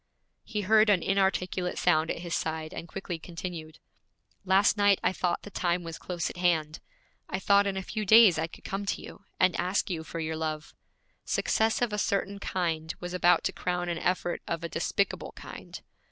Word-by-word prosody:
He 210 -2 -3
heard 215 +2 +4
an 195 -4 +3
inarticulate 190 -2 0
sound 160 -2 +2
at - - -3
his 170 -1 -5
side, 160 0 -2
and 170 - -6
quickly 175 -1 -5
continued: 165 -2 -7 0.7
'Last 195 +3 +4
night 205 -2 +4
I - - +2
thought 180 -2 -1
the 205 - -10
time 175 -1 0
was 165 -1 -7
close 175 -2 -3
at - - -7
hand. 160 -3 +1 0.5
I 185 - -1
thought 200 +1 +4
in 195 -1 -2
a 190 - -3
few 215 +3 -4
days 210 -4 +7
I 160 - 0
could - - -15
come 200 +1 -4
to - - -1
you, 200 - -12
and 185 -1 +4
ask 185 +2 0
you 160 -2 -3
for 165 - -6
your 160 0 -2
love. 155 -1 -4 0.5
Success 220 +2 +1
of 230 -3 -1
a 210 - -1
certain 200 0 -1
kind 165 -4 -2
was 175 0 -6
about 175 -1 +4
to - - -1
crown 180 -1 -2
an 170 -1 -2
effort 175 -1 -1
of 170 0 -3
a 170 - -3
despicable 200 +4 -1
kind. - - -9
180 Hz, 195 wpm, -28 LUFS, 165-195 Hz, 0.7 s, days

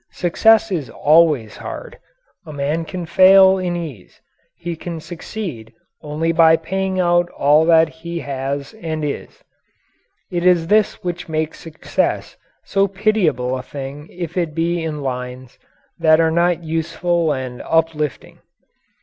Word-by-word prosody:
Success 220 +5 +3
is 160 -8 -2
always 150 -8 +3
hard. - - -8 0.5
A - - -7
man 150 +3 -2
can 175 +2 -6
fail 190 +2 +6
in 180 -1 -2
ease; 150 - -8 0.4
he 170 0 -5
can 165 0 -6
succeed 160 - -7 0.3
only 155 +2 -1
by 160 -1 +5
paying 190 +3 -2
out 175 -1 +2
all 150 +3 +3
that 165 -1 +5
he 165 +2 -7
has 140 0 -4
and 155 -2 -3
is. 145 - -6 0.9
It 175 -1 -2
is 180 -2 +4
this 210 +3 +1
which 175 -1 -4
makes 155 0 -2
success 160 -1 -2 0.3
so 195 0 +1
pitiable 190 - 0
a 130 - -4
thing 140 +3 -8
if 175 -1 -7
it 165 -4 -1
be 170 +1 0
in 150 -3 -4
lines 125 -1 -6 0.4
that 160 -1 +5
are 165 -1 +3
not 170 +1 +1
useful 165 +1 -1
and 130 -3 -4
uplifting. 160 -3 -1
165 Hz, 140 wpm, -19 LUFS, 150-175 Hz, 0.9 s, fail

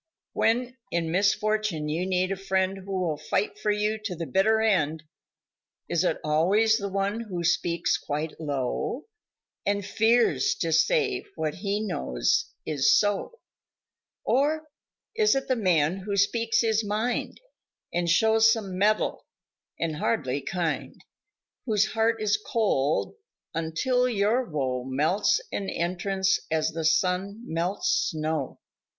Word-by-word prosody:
When 245 +3 +1
in 165 -1 -1
misfortune 205 -3 +1
you 165 +5 -1
need 185 0 0
a - - 0
friend 190 0 -1
Who 195 -1 -2
will 160 -4 -1
fight 420 0 -2
for - - -1
you 210 +1 0
to 185 -5 -3
the 165 0 -4
bitter 215 +6 +2
end 160 -8 +1 0.8
Is - - +1
it - - +1
always 200 +9 +3
the 200 -1 -3
one 200 +3 -1
who 190 -7 -4
speaks 170 0 +1
quite 150 +2 -4
low 145 - -2 0.6
And 200 -1 0
fears 220 - +2
to 165 - -2
say 420 - +2
what 155 -1 -2
he 200 +2 -2
knows, 60 - 0 0.2
is 145 -4 +2
so, 205 - -1 0.8
Or 305 +3 +1 0.5
is 430 -6 +3
it 270 - -2
the 255 - +2
man 180 -6 +2
who 200 +1 -3
speaks 225 +3 +2
his 220 -1 +1
mind 215 +4 -2 0.5
And 175 0 0
shows 220 +5 +5
some 195 -5 -2
mettle 215 +2 +1 0.5
and 160 -2 -2
hardly 130 +1 -1
kind 170 -2 -3 0.7
Whose 215 -1 +2
heart 225 0 +1
is 215 0 +1
cold 160 - 0 0.4
until 245 +11 0
your 225 +3 +1
woe 130 -5 -2
Melts 170 +11 +1
an 195 - -3
entrance 190 +2 0
as 155 -1 0
the 165 -1 -4
sun 185 +6 +1
melts 170 +5 0
snow? 155 -5 -3
195 Hz, 135 wpm, -26 LUFS, 160-220 Hz, 0.8 s, shows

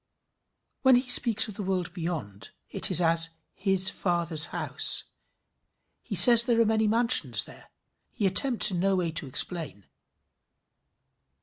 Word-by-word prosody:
When 260 -1 +3
he 250 +1 -2
speaks 230 -3 0
of 215 - -10
the 200 - -9
world 185 -3 -5
beyond, 160 - -8 0.2
it - - +3
is 180 -2 +6
as 165 -1 +2 0.2
his 190 -1 -1
Father's 170 -3 -1
house. - - -2 1.0
He - - -8
says 235 -2 +8
there 235 -1 -2
are 230 - +2
many 220 0 -2
mansions 210 - 0
there. - - -18 0.4
He 205 - -6
attempts 225 +5 +3
in 180 - -5
no 195 +2 -1
way 175 -3 -4
to 155 -2 -6
explain. 135 - -4
185 Hz, 140 wpm, -24 LUFS, 165-220 Hz, 1.0 s, says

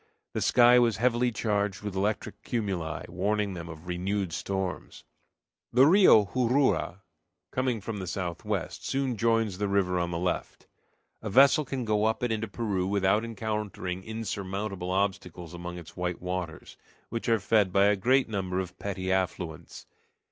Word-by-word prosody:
The - - -2
sky 125 0 +6
was 115 -3 +2
heavily 120 +1 +2
charged 105 -3 -1
with 105 -2 -4
electric 105 +3 -2
cumuli, 95 - -3
warning 100 +3 -1
them 85 -1 -7
of 80 0 -10
renewed 90 +1 -2
storms. 95 0 -4 0.7
The 130 +3 +6
Rio 165 - +7
Jurua, 125 -5 +1 0.5
coming 130 -4 -1
from 110 +1 -5
the 95 - -5
southwest, 90 -1 -3
soon 135 -2 -1
joins 115 -3 +1
the 105 - 0
river 95 -2 +1
on 85 0 -1
the 85 - -3
left. 90 +1 -3 0.6
A 110 - -4
vessel 135 +7 +6
can 130 -2 -3
go 105 -1 +1
up 110 +2 0
it 120 - +1
into 110 0 -1
Peru 100 -3 -2
without 100 +2 +2
encountering 105 -4 -4
insurmountable 100 -3 -4
obstacles 95 -3 -2
among 90 0 -6
its 85 -2 -11
white 90 -1 -3
waters, 90 -3 -5 0.3
which 115 +1 -3
are 115 -1 +3
fed 105 -2 +2
by 100 +2 +4
a 105 0 +4
great 130 +7 +3
number 95 -4 -2
of 95 -1 -6
petty 95 -2 -3
affluents. 90 -4 -3
100 Hz, 155 wpm, -28 LUFS, 90-115 Hz, 0.7 s, Rio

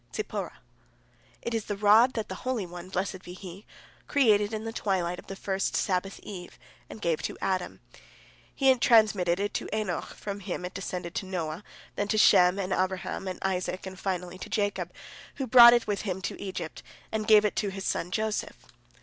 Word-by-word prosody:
Zipporah: - - -4 0.9
"It 235 - -3
is 225 -2 -1
the 205 - -3
rod 215 +5 +6
that 220 -2 -3
the 185 - -7
Holy 255 -6 -1
One, 175 +1 -9
blessed 190 0 -3
be 180 - -10
He, 185 +2 -10 0.4
created 215 -7 +3
in 220 -1 -4
the 225 0 -5
twilight 180 -5 -1
of - - -14
the 195 - -6
first 195 0 -2
Sabbath 195 +1 -1
eve, 180 -4 -9 0.3
and - - -9
gave 165 -2 +1
to - - -4
Adam. 185 -2 -2 0.7
He 270 -1 +5
transmitted 210 -7 +4
it 205 +1 -2
to - - -3
Enoch, 190 -6 -3
from 200 -1 -5
him 180 -1 -4
it 180 - -6
descended 180 -3 -5
to 190 - -3
Noah, 170 -1 -4 0.3
then 205 - 0
to 215 - 0
Shem, 180 -3 +6
and 190 -1 -1
Abraham, 185 +1 -2
and 185 - -4
Isaac, 185 0 -2
and 190 -1 -8
finally 180 -1 -3
to - - -7
Jacob, 200 -4 -1 0.4
who 270 - -3
brought 240 0 +10
it 240 -1 +2
with 205 -1 -1
him 190 -3 -3
to - - -4
Egypt, 190 -5 -5 0.3
and 215 -1 -2
gave 215 -1 +7
it 210 - 0
to 205 - 0
his 195 0 -6
son 175 - -1
Joseph. 215 +3 -2
195 Hz, 190 wpm, -28 LUFS, 180-215 Hz, 0.9 s, brought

